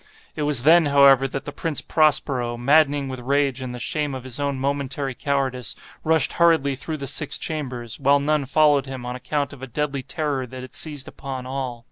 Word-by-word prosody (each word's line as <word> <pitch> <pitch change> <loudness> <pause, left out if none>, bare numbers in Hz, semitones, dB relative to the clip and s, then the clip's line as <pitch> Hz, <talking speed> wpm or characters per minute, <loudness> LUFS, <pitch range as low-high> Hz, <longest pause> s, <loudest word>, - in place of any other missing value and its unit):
It 155 - -4
was 145 -5 +3
then, 165 +1 +6
however, 140 -1 +6
that 135 +1 -6
the 145 - -5
Prince 160 +1 -2
Prospero, 135 -6 +1
maddening 145 +2 +3
with 130 -1 -6
rage 135 +1 0
and 125 -1 -5
the - - -7
shame 145 +2 -2
of 130 - -7
his 130 +1 -7
own 140 -1 -1
momentary 140 0 -2
cowardice, 130 -3 -2 0.3
rushed 160 0 +2
hurriedly 165 -5 +3
through 155 +4 -5
the 140 - -5
six 145 +2 +1
chambers, 125 -7 -5
while 140 +1 +4
none 145 -1 0
followed 145 0 +3
him 130 -2 -7
on 125 0 -4
account 140 +3 -3
of 135 - -13
a 135 - -6
deadly 140 +2 -2
terror 140 -1 -2
that 130 +1 -9
had 130 - -11
seized 145 -4 -3
upon 130 -2 -7
all. 130 -2 -4
140 Hz, 200 wpm, -23 LUFS, 130-145 Hz, 0.3 s, then